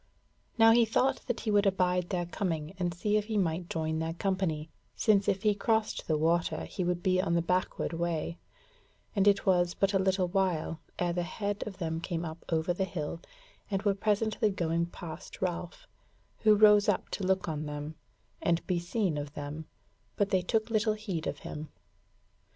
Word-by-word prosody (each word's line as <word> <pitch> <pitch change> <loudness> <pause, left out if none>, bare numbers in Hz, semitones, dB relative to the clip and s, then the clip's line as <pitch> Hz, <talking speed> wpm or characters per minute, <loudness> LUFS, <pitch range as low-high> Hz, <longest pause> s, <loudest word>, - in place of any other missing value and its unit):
Now 225 0 +7
he 235 +1 +6
thought 240 +4 +1
that 245 - -2
he 220 - -1
would 205 0 +4
abide 180 -2 +1
their 175 -2 -1
coming 165 -4 -3
and 175 -1 0
see 205 +5 0
if 210 - -1
he 215 -1 -2
might 170 -2 0
join 160 -1 -1
their 165 0 -2
company, 170 -5 -1 0.2
since 205 -3 +3
if 190 -1 +1
he 210 -1 +4
crossed 220 +1 0
the 155 - +2
water 165 0 +1
he 185 - -4
would 175 0 -1
be 185 -1 +3
on 170 -3 0
the 170 - +3
backward 180 0 -1
way: 170 0 -2 0.8
and 200 0 +3
it 200 -1 +4
was 175 -2 +3
but 195 0 +1
a 195 - +3
little 190 -1 +2
while 175 -4 0 0.2
ere 175 -1 0
the 175 - 0
head 200 +3 -3
of 195 -3 -7
them 165 -2 -2
came 170 -1 -3
up 160 +1 -7
over 165 +1 +1
the 190 - -1
hill, 165 -3 -4 0.5
and 195 -1 -1
were 205 -2 +3
presently 215 +2 +1
going 170 -3 0
past 170 -2 -9
Ralph, 175 -1 -3 0.5
who 215 -1 +5
rose 210 0 +6
up 205 - 0
to 200 - -4
look 190 0 +1
on 155 -2 -3
them, 150 +1 -5 0.5
and 170 0 +1
be 180 -2 0
seen 175 -3 -1
of 145 0 -7
them, 150 +2 -6 0.5
but 205 -1 0
they 190 - +3
took 220 +5 0
little 215 0 +2
heed 200 -7 -4
of - - -2
him. 150 +1 -6
180 Hz, 190 wpm, -30 LUFS, 165-205 Hz, 0.8 s, Now